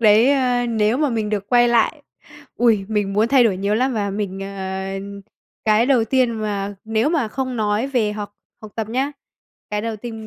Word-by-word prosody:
đấy, 220 +3 +6
a, 250 -3 +2
nếu 225 0 +1
mà 300 0 +1
mình 220 -2 -2
được 200 -2 -2
quay 240 -1 +5
lại, 240 +6 +2 0.5
ui, 225 -5 +3
mình 205 -2 -1
muốn 215 +3 +2
thay 265 -3 +5
đổi 205 -5 +2
nhiều 200 +2 0
lắm 255 +4 +1
và 205 -2 -1
mình, 195 -1 -4
ờ 190 -1 -5 0.8
cái 220 +2 +3
đầu 255 -4 +3
tiên 255 +1 +2
mà 205 -3 -3
nếu 220 +4 +1
mà 285 -10 0
không 260 +1 -3
nói 215 +2 0
về 240 -6 0
học 205 -1 -6 0.3
học 215 -1 -10
tập 220 -2 -3
nhá, 265 +5 -1 0.6
cái 210 0 -1
đầu 225 -1 -3
tiên 225 0 -8
220 Hz, 200 wpm, -21 LUFS, 210-245 Hz, 0.8 s, đấy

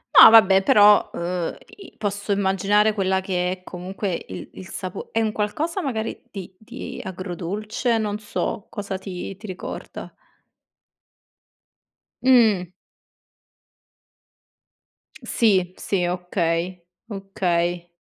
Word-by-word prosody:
No - - +12
vabbè, 200 -4 +7
però, 205 +1 +6
uhm, 175 0 -3 0.2
i 395 - -14
posso 205 0 -3
immaginare 200 +2 +2
quella 190 -2 +1
che 180 -1 -1
è 185 0 -5
comunque 185 0 -4
il 95 - -7
il 185 - -10
sapo 185 -2 -6
è 225 - +1
un 220 -1 +1
qualcosa 295 - -2
magari 225 -8 -3
di 190 -4 -9
di 235 +4 -8
agrodolce, 190 +6 -2
non 210 -1 -2
so 210 -1 -3
cosa 200 -2 -5
ti 190 0 -6
ti 215 - -10
ricorda. 185 -1 -7 2.1
Mh. 220 -9 +4 2.5
Sì, 190 -6 +2
sì, 185 -3 -1
okay, 180 0 -2 0.2
okay. 180 -4 -1
195 Hz, 105 wpm, -23 LUFS, 180-215 Hz, 2.5 s, No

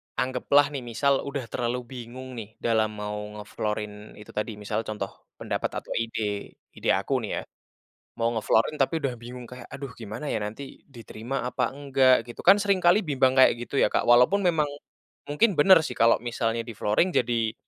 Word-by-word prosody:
Anggaplah 130 +3 +2
nih 135 - -3
misal 135 +4 +1
udah 140 -1 -3
terlalu 125 0 -1
bingung 130 +1 -8
nih, 105 - -7
dalam 110 -2 +1
mau 105 0 -4 0.2
nge-flooring 105 0 -5
itu 105 - -12
tadi. 105 +2 -2
Misalnya 105 +2 -3
contoh 100 -2 -4 0.3
pendapat, - - -2
atau - - -13
ide 115 0 -2 0.6
ide - - -2
aku - - -3
nih - - -5
ya, - - -2 0.8
mau 115 0 +1
nge-flooring, 115 +5 +1
tapi 135 +4 +2
udah 135 -3 0
bingung 125 +1 -9
kayak, 125 -1 -10
aduh 135 -2 -7
gimana 115 +5 -7
ya, - - 0
nanti 105 +6 -5 0.3
diterima 115 +2 -6
apa 125 0 -2
enggak, 135 -2 +3
gitu. 120 - -9
Kan 195 - +9
seringkali 190 -2 +4
bimbang 130 -2 +3
kayak 130 - +7
gitu 120 - -8
ya - - +4
Kak, - - +1
walaupun 125 +12 +6
memang, 155 -3 +1 0.6
mungkin 150 +11 +3
benar 185 +4 +8
sih, 125 - -4
kalau 115 0 +6
misalnya 115 0 -1
di-flooring 110 - +1
jadi, 115 -2 0
120 Hz, 175 wpm, -26 LUFS, 110-135 Hz, 0.8 s, Kan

